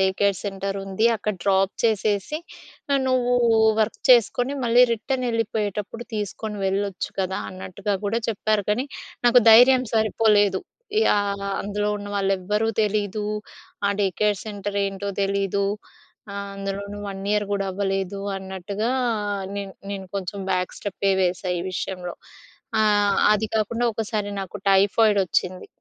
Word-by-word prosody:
Day 190 - +4
care 200 -1 +3
centre 195 0 -3
ఉంది. 195 +3 -1
అక్కడ 210 0 -2
drop 195 0 +2
చేసేసి 215 +4 +1 0.5
ఆహ్, 275 - +3
నువ్వు 245 -1 +2 0.5
వర్క్ 215 - 0
చేసుకొని 245 +3 +4
మళ్ళీ 240 +2 +6
రిటర్న్ 255 +3 -2
ఎళ్ళిపోయేటప్పుడు 215 0 -2
తీసుకొని 210 +1 -4
వెళ్ళొచ్చు 195 0 -2
కదా! 190 0 -1
అన్నట్టుగా 185 +2 -4
గూడా 225 +3 0
చెప్పారు. 215 -1 0
కానీ 250 +6 -1 0.4
నాకు 245 +1 +7
ధైర్యం 255 +3 +7
సరిపోలేదు. 210 -2 +3 0.5
యాహ్! 200 -1 +1 0.2
అందులో 205 +1 -2
ఉన్నవాళ్ళేవ్వరూ 205 +1 0
తెలీదు. 210 0 -1 0.6
ఆ - - +3
డే - - +3
కేర్ 210 -2 +2
సెంటర్ 205 -1 -4
ఏంటో 195 +1 -4
తెలీదు. 200 0 0 0.7
ఆహ్, 200 0 -5
అందులోను 195 +1 -5
1 195 -1 -6
ఇయర్ 210 0 +2
గూడా 200 -1 0
అవ్వలేదు 195 0 -2 0.2
అన్నట్టుగా 190 +3 -4 0.7
నేను 200 -1 -5 0.2
నేను 195 -1 -5
కొంచెం 195 +1 -4
బ్యాక్ 180 0 -1
స్టెపే 195 0 -1
వేసా 185 0 0
ఈ - - -2
విషయంలో. 180 -1 -4 0.7
ఆహ్, 205 -2 +3 0.2
అది 215 +1 +1
కాకుండా 225 +2 0
ఒకసారి 210 -1 -2
నాకు 195 +1 -6
టైఫాయిడ్ 200 +2 +4
ఒచ్చింది. 185 +2 -1
205 Hz, 130 wpm, -24 LUFS, 195-215 Hz, 0.7 s, నాకు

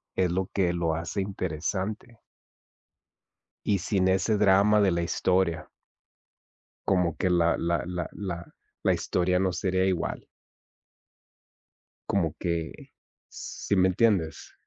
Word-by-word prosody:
es 95 -1 +2
lo 95 +1 -1
que 90 -3 +1
lo 85 -2 0
hace 85 +5 -3
interesante. 95 +5 -4 1.5
Y 100 -2 +2
sin 95 +1 +1
ese 95 +3 +2
drama 105 +1 +5
de 100 -2 +4
la 85 0 0
historia. 90 0 0 1.2
Como 90 -4 +2
que 95 - 0
la 85 -1 +3
la 85 0 0
la 90 0 -4
la 85 -4 -4 0.4
la - - +4
historia 90 0 0
no 95 -1 +1
sería 95 +1 0
igual. 90 -3 -2 1.8
Como 85 -6 0
que, 85 -2 -2 0.6
¿sí 100 - -4
me 95 -1 +4
entiendes? 95 -6 +1
95 Hz, 120 wpm, -27 LUFS, 85-95 Hz, 1.8 s, drama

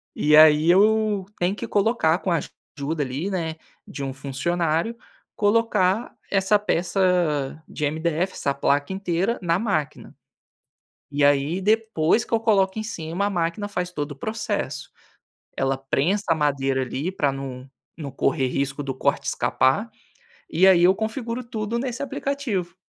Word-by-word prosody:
E 150 +1 +3
aí 155 +1 +7
eu 210 0 +3
tenho 175 +2 +1
que - - -6
colocar 200 -6 +2
com 185 - -2
a 170 - +2 0.4
ajuda 145 +2 -2
ali, 140 +8 -3
né, 165 -4 -3 0.3
de - - -8
um 135 -1 -3
funcionário, 165 - -1 0.4
colocar 210 -1 +1 0.2
essa 195 +1 +3
peça 175 -7 0
de - - -6
MDF, 165 +4 -1
essa 140 - -1
placa 140 +4 0
inteira 190 +3 -1
na 170 -1 +1
máquina 165 -9 -3 1.0
e 145 0 0
aí 145 +5 +2
depois 220 -2 +2
que - - -8
eu 230 - +4
coloco 205 -3 +2
em - - -3
cima, 175 -2 -3
a - - +1
máquina 175 +2 -2
faz 180 -3 -3
todo 145 -3 -4
o - - -16
processo 220 +11 -4 0.7
ela 135 0 0
prensa 140 +9 0
a - - +5
madeira 135 -3 0
ali, 135 +6 -3
pra 145 -7 0
não 135 -1 -7 0.3
não 145 -4 -6
correr 135 +1 0
risco 135 +2 -2
do 135 -1 -4
corte 130 - 0
escapar, 135 - +1 0.6
e 180 +4 +4
aí 185 -3 +6
eu 180 +2 +7
configuro 230 +3 -4
tudo 225 -1 -3
nesse 255 +1 -3
aplicativo. 255 -10 -3
175 Hz, 150 wpm, -23 LUFS, 145-205 Hz, 1.0 s, aí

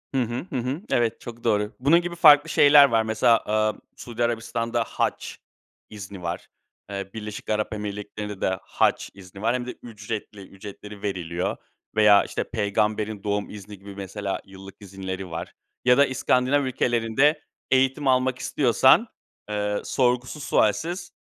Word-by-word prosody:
Hı 130 - +3
hı. 120 +6 -3
Hı - - -6
hı. 130 +8 -3
Evet, 115 -1 +1
çok 120 -1 -10
doğru. 105 -1 0
Bunun 150 +7 +4
gibi 175 0 -5
farklı 150 -2 +7
şeyler 145 -1 +7
var. 115 -2 +2
Mesela, 110 +1 +3
aaa, 110 0 +1 0.2
Suudi 120 0 -4
Arabistan'da 115 0 -1
hac - - -2 0.6
izni 100 -3 -9
var, 85 -2 -5 0.4
eee, 100 -1 -5
Birleşik 105 -1 -7
Arap 110 0 -1
Emirlikleri'nde 105 -1 -6
de 95 -1 0
hac - - 0
izni 95 0 -13
var, 115 +2 +1
hem 125 - -3
de 125 - -5
ücretli, 105 -2 -7
ücretleri 100 +1 -11
veriliyor 90 -4 -3 0.4
veya, 105 -2 +6
işte, - - -3
peygamberin 105 0 -1
doğum 105 0 -2
izni 105 -1 -10
gibi 100 0 -11
mesela 100 0 -4
yıllık 95 0 -12
izinleri 95 -2 -7
var 80 - -6 0.3
ya 125 0 +5
da 140 - +6
İskandinav 130 +2 +1
ülkelerinde 125 +4 +1 0.3
eğitim 135 +2 +2
almak 130 0 +2
istiyorsan, 130 - +4 0.4
eee, 105 0 -1
sorgusuz 125 +3 0
sualsiz 175 - 0
110 Hz, 145 wpm, -24 LUFS, 100-125 Hz, 0.6 s, farklı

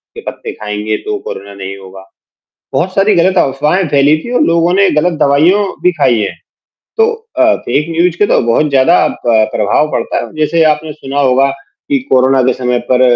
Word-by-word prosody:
के - - -8
पत्ते - - -8
खाएँगे 105 0 -4
तो 425 -1 -2
कोरोना 100 +1 -8
नहीं 100 0 -7
होगा। 95 0 -13 0.7
बहुत 185 +2 -1
सारी 200 +1 +3
गलत 180 +2 +2
अफवाहें 150 +7 +1
फैली 145 +1 +3
थी 240 - -7
और - - +2
लोगों 170 +1 +2
ने 200 0 +3
गलत 165 +1 0
दवाइयाँ 165 +9 +3 0.2
भी 180 - +3
खाई 125 -8 +1
है, 100 - -3 0.6
तो 450 +1 +3 0.3
अ, - - +4
फेक 150 - -2
न्यूज़ 170 +1 +1
के 205 - +3
तो - - +2
बहुत 150 +6 +2
ज़्यादा 140 +6 +3 0.2
प 110 -2 +3
प्रभाव 110 +9 +1
पड़ता - - -2
है। - - -15
जैसे 155 +2 +1
आपने 150 0 -6
सुना 140 -1 -4
होगा 135 0 +3 0.4
कि 280 - +2
कोरोना 130 0 +3
के 130 0 +2
समय 125 -1 -1
पर 130 0 +3
145 Hz, 190 wpm, -12 LUFS, 125-170 Hz, 0.7 s, अ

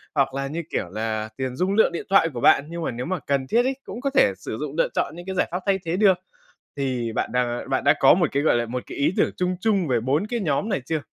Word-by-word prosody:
hoặc 140 -2 +2
là, 135 0 -2
như 165 +4 -4
kiểu 90 - -2
là, 110 +1 -3
tiền 130 -1 -3
dung 185 +7 0
lượng 220 -2 +4
điện 170 - -5
thoại 195 -4 +4
của 120 - -5
bạn. 140 - +5
Nhưng 170 0 -5
mà - - -1
nếu 120 +1 -5
mà 185 0 -2
cần 140 -2 -1
thiết 235 - +3
ấy, 265 +1 0
cũng 225 +6 -8
có 275 - 0
thể 270 - +4
sử 110 - -6
dụng 150 -1 -5
lựa - - +3
chọn - - -1
những 175 +1 -9
cái 190 0 -4
giải 180 - +1
pháp 180 - -2
thay 195 -1 +2
thế 165 +2 -1
được. 195 -3 +5 0.6
Thì 130 -4 -2
bạn 110 - -2
đang 125 0 -1
bạn 135 - 0
đã 145 +1 +6
có 135 - +7
một 175 -1 +2
cái, 140 +1 +1
gọi 155 - +3
là, 120 0 0
một 125 +2 -4
cái - - -8
ý 150 +4 +2
tưởng - - +2
chung 180 0 -1
chung 200 -6 +1
về 120 -3 +2
4 140 - 0
cái 235 +1 -2
nhóm 170 +2 0
này 195 -8 0
chưa? 160 -1 -1
150 Hz, 295 wpm, -24 LUFS, 125-185 Hz, 0.6 s, có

